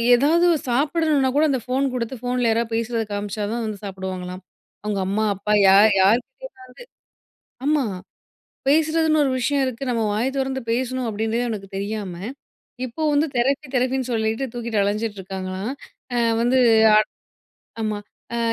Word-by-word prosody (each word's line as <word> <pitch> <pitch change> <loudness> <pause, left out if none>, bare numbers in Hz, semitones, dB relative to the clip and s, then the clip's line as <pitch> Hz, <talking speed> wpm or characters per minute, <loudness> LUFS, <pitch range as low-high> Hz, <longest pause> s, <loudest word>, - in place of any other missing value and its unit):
எதாவது 320 +7 +3 0.2
சாப்பிடணுனா 290 +1 +2
கூட 300 - +4
அந்த 265 - +1
ஃபோன் 260 +2 0
கொடுத்து 245 +1 -3
ஃபோன்ல 245 -1 0
யாராவது 230 0 0
பேசுறத 230 0 -1
காமிச்சா 205 +1 -3
தான் 235 0 -2
வந்து 215 -2 -5
சாப்பிடுவாங்களாம். 185 -1 -6 0.4
அவங்க 210 -2 -2
அம்மா, 210 +3 0
அப்பா 205 +2 -1
யா 190 - +7 0.3
யார்க்கிட்டயாவது 240 - +1 1.2
ஆமா, 300 -2 +2 0.8
பேசறதுன்னு 315 +1 +3
ஒரு 270 - +1
விஷயம் 280 +3 +1
இருக்கு. 255 +1 -4
நம்ம 230 -2 0
வாய 220 +4 0
தொறந்து 265 0 -1
பேசணும் 255 +1 -1
அப்பிடின்றதே 220 +2 -1
அவனுக்கு 205 -4 -5
தெரியாம, 200 -2 -4 0.7
இப்போ 245 +6 -6
வந்து 290 +2 +3
தெரப்பி, 275 +5 +1
தெரப்பின்னு 255 0 0
சொல்லிட்டு 220 +3 0
தூக்கிட்டு 235 -3 -2
அலஞ்சிட்டு 210 +1 -1
இருக்காங்களாம். 190 +3 -5 0.4
அ 240 - +1 0.2
வந்து 245 +2 +3 1.0
ஆட் - - -22
ஆமா, 215 -1 -1 0.4
அ - - -1
235 Hz, 140 wpm, -22 LUFS, 210-265 Hz, 1.2 s, யா